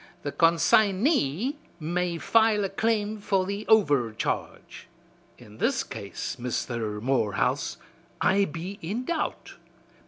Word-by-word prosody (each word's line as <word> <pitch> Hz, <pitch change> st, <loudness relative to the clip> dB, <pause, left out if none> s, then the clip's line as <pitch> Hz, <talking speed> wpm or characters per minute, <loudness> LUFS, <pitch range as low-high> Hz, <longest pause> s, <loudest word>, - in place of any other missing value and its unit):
The 145 Hz, -, -2 dB
con 165 Hz, +2 st, +3 dB
sign 195 Hz, +5 st, +3 dB
ey 260 Hz, -, +1 dB, 0.2 s
may 175 Hz, +2 st, -1 dB
file 220 Hz, +2 st, +3 dB
a -, -, -2 dB
claim 215 Hz, +1 st, 0 dB
for 195 Hz, -2 st, +1 dB
the 200 Hz, +2 st, -4 dB
overcharge.' 145 Hz, -, 0 dB, 0.5 s
In 110 Hz, -2 st, -15 dB
this -, -, +1 dB
case, -, -, -6 dB
Misther 115 Hz, -3 st, -3 dB
Morehouse, 120 Hz, -3 st, 0 dB, 0.4 s
I 200 Hz, +1 st, +3 dB
be 180 Hz, +4 st, -6 dB
in 215 Hz, +10 st, -3 dB
doubt. 335 Hz, +1 st, -3 dB
185 Hz, 120 wpm, -26 LUFS, 140-215 Hz, 0.5 s, con